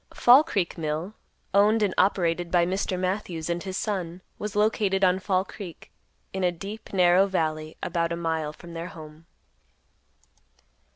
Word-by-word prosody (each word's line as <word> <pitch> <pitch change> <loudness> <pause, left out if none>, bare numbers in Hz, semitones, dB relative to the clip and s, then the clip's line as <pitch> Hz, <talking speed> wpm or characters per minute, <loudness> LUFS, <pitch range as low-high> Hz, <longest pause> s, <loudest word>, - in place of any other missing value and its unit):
Fall 255 +5 +7
Creek 195 - -2
Mill, 160 +5 -3 0.4
owned 210 +2 +4
and 200 - +1
operated 175 -3 +1
by 175 -1 +3
Mr. 185 0 -1
Matthews 180 -3 -2
and 170 0 -2
his 190 0 -4
son, 185 -5 -3 0.2
was 210 -1 -5
located 210 -2 +1
on 185 0 +4
Fall 190 0 0
Creek 185 -6 -10 0.4
in 190 -1 -2
a 180 - +3
deep, 200 +6 -8
narrow 180 0 +4
valley, 155 -4 -2
about 170 -1 -1
a - - 0
mile 160 -2 -2
from 170 +2 -12
their 165 +1 -5
home. 155 -1 -12
180 Hz, 155 wpm, -26 LUFS, 170-195 Hz, 0.4 s, Fall